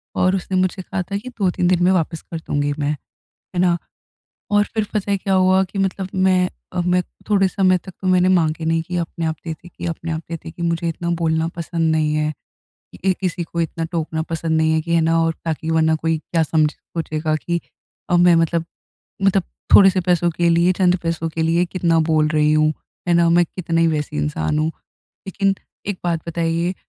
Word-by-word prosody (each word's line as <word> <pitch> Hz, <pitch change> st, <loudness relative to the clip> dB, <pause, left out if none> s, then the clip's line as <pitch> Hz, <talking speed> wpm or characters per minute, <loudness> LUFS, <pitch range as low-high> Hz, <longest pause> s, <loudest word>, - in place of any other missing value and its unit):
और 185 Hz, +1 st, +2 dB
उसने 190 Hz, 0 st, -2 dB
मुझसे 185 Hz, +1 st, 0 dB
कहा 185 Hz, +1 st, -3 dB
था 200 Hz, +3 st, -4 dB
की, 220 Hz, +5 st, -7 dB
2-3 190 Hz, -7 st, 0 dB
दिन 175 Hz, -1 st, +3 dB
में 180 Hz, -, +5 dB
वापस 165 Hz, -3 st, 0 dB
कर 165 Hz, -, -7 dB
दूँगी 145 Hz, -2 st, -1 dB
मैं, 145 Hz, 0 st, 0 dB
है 150 Hz, -, -9 dB, 0.4 s
ना। 175 Hz, -1 st, +3 dB, 0.7 s
और 205 Hz, 0 st, +5 dB
फिर 220 Hz, -2 st, 0 dB
पता 205 Hz, -1 st, -1 dB
है 200 Hz, -, +2 dB
क्या 195 Hz, 0 st, -1 dB
हुआ? 185 Hz, 0 st, +4 dB
कि 195 Hz, +1 st, -6 dB
मतलब 190 Hz, 0 st, -1 dB
मैं 185 Hz, -1 st, +3 dB, 0.2 s
अ, 180 Hz, -, 0 dB
मैं 180 Hz, +1 st, +2 dB, 0.3 s
थोड़े 195 Hz, -2 st, +4 dB
समय 185 Hz, -1 st, +3 dB
तक 190 Hz, +2 st, -11 dB
तो 190 Hz, -, -2 dB
मैंने 185 Hz, 0 st, +4 dB
माँगे 165 Hz, -3 st, +2 dB
नहीं 165 Hz, 0 st, +1 dB
कि 180 Hz, +2 st, -6 dB
अपने 170 Hz, 0 st, -3 dB
आप 160 Hz, 0 st, -1 dB
दे 165 Hz, -, -3 dB
देगी 170 Hz, +3 st, -15 dB
कि -, -, -5 dB
अपने 165 Hz, 0 st, -4 dB
आप 160 Hz, 0 st, -2 dB
दे 170 Hz, -, -3 dB
देगी, 165 Hz, +1 st, -9 dB
मुझे 170 Hz, 0 st, 0 dB
इतना 170 Hz, +1 st, -4 dB
बोलना 160 Hz, -1 st, +1 dB
पसंद 165 Hz, -1 st, -1 dB
नहीं 155 Hz, -1 st, +1 dB
है। 155 Hz, 0 st, 0 dB, 0.7 s
ए 190 Hz, -, +4 dB
किसी 180 Hz, -2 st, -1 dB
को 170 Hz, +1 st, -3 dB
इतना 165 Hz, 0 st, -3 dB
टोकना 160 Hz, -1 st, -2 dB
पसंद 165 Hz, -1 st, -1 dB
नहीं 160 Hz, 0 st, +3 dB
है, 160 Hz, -, +2 dB
कि 170 Hz, +1 st, -3 dB
है 165 Hz, -, +4 dB
ना 165 Hz, +1 st, +2 dB
और 165 Hz, 0 st, +1 dB
ताकि 160 Hz, 0 st, -2 dB
वरना 160 Hz, 0 st, +3 dB
कोई 165 Hz, 0 st, +1 dB
क्या 165 Hz, +1 st, -1 dB
समझ 155 Hz, 0 st, +2 dB
सोचेगा 155 Hz, -1 st, -3 dB
कि 170 Hz, +2 st, -2 dB, 0.5 s
अब 175 Hz, -, +4 dB
मैं 175 Hz, -1 st, +6 dB
मतलब 165 Hz, 0 st, +1 dB, 0.6 s
मतलब, 195 Hz, -1 st, +3 dB, 0.3 s
थोड़े 195 Hz, -1 st, +9 dB
से 185 Hz, 0 st, 0 dB
पैसों 175 Hz, -1 st, +2 dB
के 170 Hz, +1 st, +1 dB
लिए, 170 Hz, +2 st, +4 dB
चंद 180 Hz, -1 st, +3 dB
पैसों 165 Hz, -1 st, -1 dB
के 160 Hz, +1 st, -3 dB
लिए, 165 Hz, +2 st, +2 dB
कितना 170 Hz, -2 st, +1 dB
बोल 155 Hz, -1 st, +3 dB
रही 150 Hz, -1 st, +2 dB
हूँ। 155 Hz, 0 st, +3 dB, 0.3 s
है 175 Hz, -, +3 dB
ना, 170 Hz, 0 st, +4 dB
मैं 175 Hz, +1 st, +4 dB
कितने 165 Hz, -1 st, -2 dB
ही 165 Hz, -, +4 dB
वैसी 150 Hz, -, -2 dB
इंसान 75 Hz, -, -1 dB
हूँ। 155 Hz, -, +1 dB, 0.6 s
लेकिन 195 Hz, 0 st, +1 dB, 0.3 s
एक 200 Hz, -2 st, -3 dB
बात 170 Hz, -2 st, 0 dB
बताइए 170 Hz, +2 st, -1 dB
170 Hz, 215 wpm, -20 LUFS, 160-185 Hz, 0.7 s, थोड़े